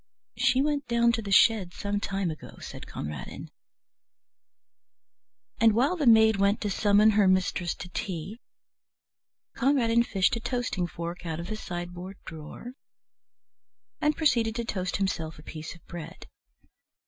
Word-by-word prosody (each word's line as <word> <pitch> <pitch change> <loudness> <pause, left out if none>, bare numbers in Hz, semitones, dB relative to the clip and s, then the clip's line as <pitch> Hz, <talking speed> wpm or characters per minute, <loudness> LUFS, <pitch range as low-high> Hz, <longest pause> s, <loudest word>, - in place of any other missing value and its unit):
"She 260 +1 +3
went 290 -1 -1
down 235 0 +3
to 230 -1 -1
the 200 -2 -6
shed 195 -2 +4
some 205 0 -2
time 195 -3 -2
ago," 155 - -10
said - - -9
Conradin. 75 -2 -7 2.1
And 225 0 +5
while 270 +10 +3
the 300 -7 -1
maid 220 -2 +6
went 200 +2 +2
to 205 - -1
summon 205 +2 +4
her 205 -2 +4
mistress 185 -2 +1
to 180 - -8
tea, 185 +4 -5 1.2
Conradin 235 -3 +3
fished 200 -2 +1
a - - -3
toasting 240 -7 -2
fork 170 +1 -6
out 160 0 -3
of 170 +2 -6
the 215 - -2
sideboard 175 -1 -6
drawer 160 +9 -9 1.3
and 300 0 +2
proceeded 230 -8 +2
to 235 -1 -2
toast 185 -5 -2
himself 165 -5 -2
a 150 - -13
piece 155 0 -8
of 170 - -20
bread. 170 -3 -9
200 Hz, 145 wpm, -27 LUFS, 175-230 Hz, 2.1 s, maid